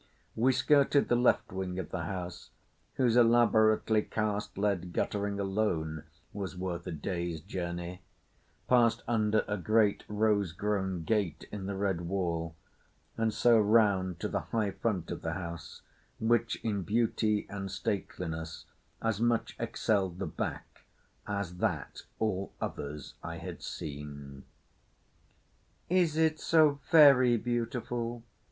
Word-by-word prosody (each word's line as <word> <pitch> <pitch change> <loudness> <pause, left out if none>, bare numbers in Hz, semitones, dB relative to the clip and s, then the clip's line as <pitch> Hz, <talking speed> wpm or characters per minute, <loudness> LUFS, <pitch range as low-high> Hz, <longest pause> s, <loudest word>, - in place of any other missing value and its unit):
We 125 +4 +3
skirted 140 +2 +3
the 120 - +4
left 120 +1 +2
wing 95 -1 -4
of 95 -4 -5
the 90 -2 -3
house, 90 0 -6 0.5
whose 120 -3 +2
elaborately 110 -2 +4
cast 105 -2 -3
lead 95 -4 -1
guttering 100 -1 -1
alone 85 -6 -1 0.3
was 95 -2 -5
worth 90 -1 -4
a - - -3
day's 85 +1 -3
journey; 85 +2 -5 0.7
passed 120 -2 +4
under 110 -2 +2
a 105 - -1
great 105 +3 +2
rose 105 -4 +1
grown 95 -2 -1
gate 100 0 -1
in 100 -2 -5
the 100 - -3
red 95 -3 -1
wall, 85 -3 -2 0.6
and 115 0 +1
so 115 +1 +4
round 100 -5 +3
to - - 0
the - - -1
high 110 -3 -1
front 95 -3 -2
of - - -5
the - - -2
house 85 -3 -7 0.4
which 115 +1 +2
in 105 -3 -1
beauty 110 0 +1
and 100 -1 -5
stateliness 80 -4 -4 0.4
as 110 -2 0
much 120 -1 +1
excelled 95 -5 0
the - - -3
back - - -5 0.4
as 100 -4 -3
that - - -2 0.2
all 100 -3 -1
others 75 -1 -5
I - - -6
had - - -7
seen. 70 -2 -7 1.4
"Is 175 -4 +2
it 160 -1 +2
so 155 -3 +4
very 135 -6 +7
beautiful?" 120 0 -3
100 Hz, 130 wpm, -30 LUFS, 90-115 Hz, 1.4 s, very